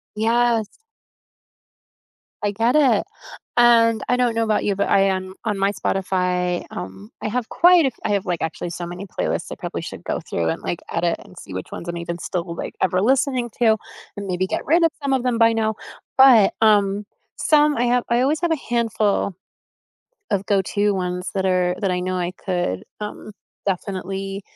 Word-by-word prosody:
Yes. 230 0 +2 1.7
I 205 - 0
get 230 +5 +1
it. 295 -3 +4 0.5
And 230 -2 +5
I 250 - +3
don't 245 -2 +2
know 230 - +2
about 215 -2 +1
you, 200 - +1
but 200 - 0
I 195 - +4
am 190 -1 0
on 210 -2 0
my 195 +1 +2
Spotify, 180 -2 -1
um, 95 +3 -8
I - - -2
have 230 +1 -2
quite 350 -2 +5
a - - +4
f 260 - -3
I - - -1
have, 200 0 0
like, 175 -3 -2
actually 160 +2 -3
so 175 0 -5
many 180 +3 -7
playlists 195 - -3
I - - -4
probably - - -5
should - - -8
go - - -2
through 80 -1 -2
and, - - -3
like, 175 - -3
edit 170 0 0
and 180 - -17
see 95 - -10
which 95 - -5
ones 170 - -7
I'm 175 0 -3
even 170 0 -4
still, 170 -1 -4
like, - - -5
ever 185 0 +2
listening 255 +1 +1
to, 220 -2 +5 0.4
and 200 - -5
maybe 185 0 -1
get - - -3
rid 335 +3 +4
of 330 - +5
some 275 -1 +1
of 265 - +2
them 250 -2 +1
by 230 0 +5
now, 220 -1 0 0.4
but, 255 -7 +7
um, 205 -2 +3 0.3
some 300 -1 +4
I 240 - +2
have 245 0 +2
I 235 +1 +3
always 290 +4 +1
have 345 -1 +1
a 320 - +2
handful 220 -4 +1 1.0
of 195 0 0
go-to 205 +1 +1
ones 180 -1 -3
that 190 -1 0
are 180 -1 +2
that 195 - +1
I 180 - 0
know 185 0 -2
I 180 0 -2
could, 175 - -1 0.2
um, 210 0 -6 0.4
definitely 195 +1 -3
200 Hz, 195 wpm, -22 LUFS, 180-235 Hz, 1.7 s, but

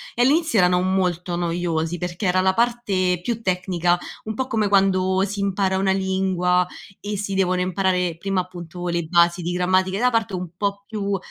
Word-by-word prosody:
E 240 - 0
all'inizio 295 - +3
erano 180 0 +4
molto 180 -2 0
noiosi 170 -1 -1
perché 180 +2 -3
era 185 +1 +2
la 190 0 +3
parte 205 -7 +1
più 230 +3 -3
tecnica, 180 -2 +1 0.3
un 220 0 -5
po' 260 +1 -2
come 220 -5 0
quando 190 -1 +3
si 200 0 -4
impara 195 -1 0
una 190 0 +2
lingua 190 -2 +1 0.4
e 205 0 -4
si 200 -1 -3
devono 185 -1 +1
imparare 180 -2 0
prima, 195 +1 -1
appunto, 180 -1 -6
le 170 -1 -1
basi 170 +1 +3
di 175 +1 -3
grammatica 185 +2 +1
da 250 +1 +3
parte 225 -4 0
un 180 -2 -5
po' 200 +1 -3
più 200 -3 -2
185 Hz, 180 wpm, -22 LUFS, 180-200 Hz, 0.4 s, erano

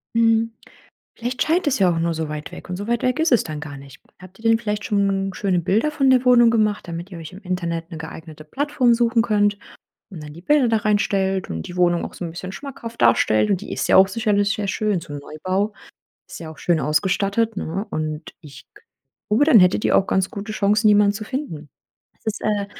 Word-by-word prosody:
Mhm. 230 0 +3 0.6
Vielleicht 245 +2 -2
scheint 335 +2 +1
es 280 -2 +1
ja 190 -3 +4
auch 165 - -2
nur 165 0 0
so 160 -1 -3
weit 150 0 -6
weg - - -10
und 180 - -3
so 205 +2 -6
weit 235 0 0
weg 255 +2 0
ist 320 -2 +2
es 240 - +4
dann 155 -2 -6
gar 145 -2 -8
nicht. 135 -1 -13 0.2
Habt 185 +1 -15
ihr 225 0 -1
denn 225 0 +4
vielleicht 210 -2 -3
schon 195 -1 0
schöne 190 -3 0
Bilder 205 - +1
von 275 -3 +1
der 260 -1 +4
Wohnung 240 -2 +6
gemacht, 215 -4 0
damit 170 +3 -6
ihr 175 - -8
euch 160 +2 -9
im 185 - -11
Internet 170 -2 -3
'ne 165 - -7
geeignete 160 -1 -10
Plattform 260 - +1
suchen 230 0 +2
könnt 205 -2 +1 0.5
und 180 -7 -9
dann 150 0 -9
die 170 - -12
Bilder 285 +5 +3
da 225 -1 +2
reinstellt 195 -3 0
und 80 -1 -4
die 175 - -9
Wohnung 175 -1 +2
auch - - -8
so 180 - -6
'n 165 - -6
bisschen 185 +2 -7
schmackhaft 235 -1 -8
darstellt? 110 -2 +3
Und 190 -1 +1
die 215 - -8
ist - - -2
ja - - +4
auch 190 0 +7
sicherlich 205 -1 +1
sehr 205 -1 -3
schön, 210 -2 0
so 165 -3 -10
'n 145 - -5
Neubau 185 +8 -3 0.6
ist - - -10
ja 160 -2 -7
auch 160 - -13
schön 170 -3 +1
ausgestattet, 200 +8 0
ne? 190 +4 -4
Und 155 0 -4
ich 150 -5 -14
k 415 - -19 0.5
glaube, 220 +7 +3
dann 275 -8 +7
hättet 180 +3 +3
ihr - - +3
auch 195 - +3
ganz 190 -1 +1
gute 205 +1 -6
Chancen, 210 +1 +2
jemanden 205 -1 +5
zu 205 - -7
finden. 185 - -5 0.5
Das - - -36
ist, 220 0 -2
äh, 205 -1 0
200 Hz, 235 wpm, -21 LUFS, 170-225 Hz, 0.6 s, auch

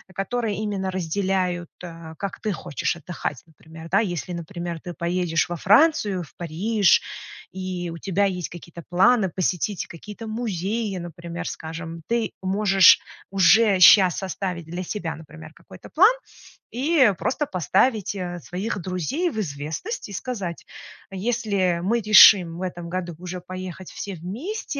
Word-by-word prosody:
которые 220 +2 -2
именно 200 -3 -2
разделяют, 185 -1 -1
э, 165 -2 -9
как 200 -2 -5
ты 215 - -1
хочешь 175 -1 -3
отдыхать, 160 -5 -5
например, 160 +1 -13
да. 195 - +4
Если 180 -4 -3
например 170 0 -5
ты 175 - -7
поедешь 170 0 -1
во 175 - -3
Францию, 205 - +3
в 160 - -16
Париж, 185 +4 +2 0.5
и 185 -2 -4
у - - -7
тебя 195 +2 +1
есть 180 -3 -2
какие-то 170 0 -11
планы 190 +3 +4
посетить 185 +2 -1
какие-то 210 +6 -10
музеи, 215 -1 -2
например, 170 0 -7
скажем, 165 +1 -7
ты 235 -1 0
можешь 195 -1 +5 0.3
уже 195 +2 +5
щас 185 -1 +7
составить 185 -2 -4
для 175 +3 -5
себя, 180 -2 -4
например, 160 0 -12
какой-то - - -14
план, 390 +8 +6 0.6
и 265 -2 +3
просто 290 - -1
поставить, 195 - +1
э, 175 -3 -5
своих 195 +6 -4
друзей 185 - -2
в 220 - -4
известность 155 - -5
и - - -8
сказать: 195 -6 -5 0.5
"Если 200 -4 0
мы 230 +6 +1
решим 195 -5 +7
в - - -7
этом 175 -2 -5
году 175 -1 -4
уже 180 +1 -7
поехать 185 0 -8
все 200 - -6
вместе, 230 - -6
185 Hz, 145 wpm, -23 LUFS, 170-210 Hz, 0.6 s, щас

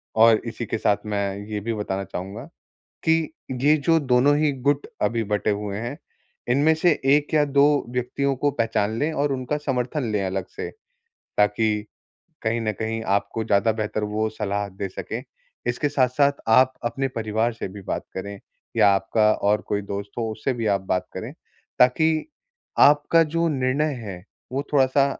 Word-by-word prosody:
और 115 0 +6
इसी 115 +1 -4
के 115 - -2
साथ 100 -1 +2
मैं 100 -2 -2
ये 105 - -2
भी 115 +2 -2
बताना 100 -2 -3
चाहूँगा 95 +6 -6 0.6
कि 160 -1 +2 0.3
ये 150 +2 +5
जो 165 -1 +5
दोनों 135 +1 +3
ही 150 -1 +2 0.2
गुट 145 0 +2 0.2
अभी 115 -1 +1
बटे 105 +1 -1
हुए 100 -1 -3
हैं, 120 +6 -4 0.5
इनमें 145 +5 +4
से 170 +2 +3
1 145 +2 +3
या 150 -1 +5
2 145 +1 +3
व्यक्तियों 125 +3 -1
को 145 +2 +2
पहचान 110 -3 0
लें 155 +3 +1
और 145 -1 0
उनका 130 +3 -2
समर्थन 130 -3 -2
ले 105 - 0
अलग 95 0 -2
से, - - -4 0.7
ताकि 105 +1 +2 0.6
कहीं 115 +1 0
न 110 -1 -1
कहीं 110 0 -2
आपको 100 +3 -1
ज़्यादा 105 +1 +3
बेहतर 110 -1 -2
वो 105 +1 -1
सलाह 105 -2 -2
दे 95 +1 -5
सकें। 90 - -6 0.4
इसके 120 +5 0
साथ-साथ 140 0 +3 0.2
आप 130 +3 +5
अपने 135 +3 -1
परिवार 110 -1 -1
से 115 - -5
भी 100 +1 -10
बात - - -3
करें 100 +1 -5 0.4
या 105 -3 +6
आपका 105 +3 +2
और 105 +1 +1
कोई 100 0 0
दोस्त 100 0 -5
हो 115 -1 -1
उससे 110 +5 -2
भी 115 -2 -3
आप 100 -2 +2
बात 90 - 0
करें, - - -5 0.5
ताकि 155 +5 +3 0.5
आपका 150 +3 +6
जो 170 0 +2
निर्णय 140 +2 0
है, 95 -4 -7 0.3
वो 135 +2 -1
थोड़ा-सा 135 0 +4
115 Hz, 170 wpm, -24 LUFS, 105-140 Hz, 0.7 s, और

